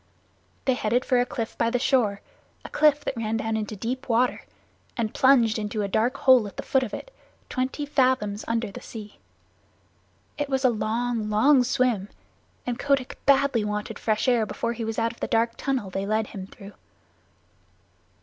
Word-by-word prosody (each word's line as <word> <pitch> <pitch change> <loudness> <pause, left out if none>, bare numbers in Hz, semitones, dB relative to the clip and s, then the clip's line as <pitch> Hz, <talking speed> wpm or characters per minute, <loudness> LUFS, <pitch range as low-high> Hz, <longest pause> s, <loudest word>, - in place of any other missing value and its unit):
They 260 - +3
headed 245 +1 0
for 250 - +3
a 245 - -1
cliff 230 -2 -4
by 230 - +3
the 245 - +1
shore 235 -6 +1 0.4
a - - -6
cliff 300 -1 +3
that - - -2
ran 225 -1 -1
down 225 0 -2
into 215 0 -3
deep 250 +6 -4
water, 245 +2 +1 0.5
and 225 -3 -1
plunged 240 -5 +4
into 210 0 -2
a - - -1
dark 235 +7 0
hole 255 -6 +5
at 200 - -12
the - - -4
foot 265 - +2
of 245 -5 -3
it, - - -8 0.4
twenty 260 +3 -2
fathoms 255 -7 +1
under 230 -2 -1
the - - -9
sea. 210 -2 -10 1.2
It 290 -1 -1
was 265 -1 0
a 255 - +5
long, 225 0 -1
long 250 +6 +5
swim, 240 -5 0 0.6
and 245 0 -3
Kotick 275 -3 0
badly 275 -4 +4
wanted 210 +1 -4
fresh 215 +3 0
air 235 -4 +3
before 235 +3 -2
he 235 0 -5
was 225 0 -3
out 230 0 +1
of 235 - -17
the - - -2
dark 230 +1 +2
tunnel 260 -9 -2
they 195 +2 -3
led 215 +1 +1
him 190 -2 -8
through. 200 0 -12
230 Hz, 185 wpm, -25 LUFS, 215-255 Hz, 1.2 s, hole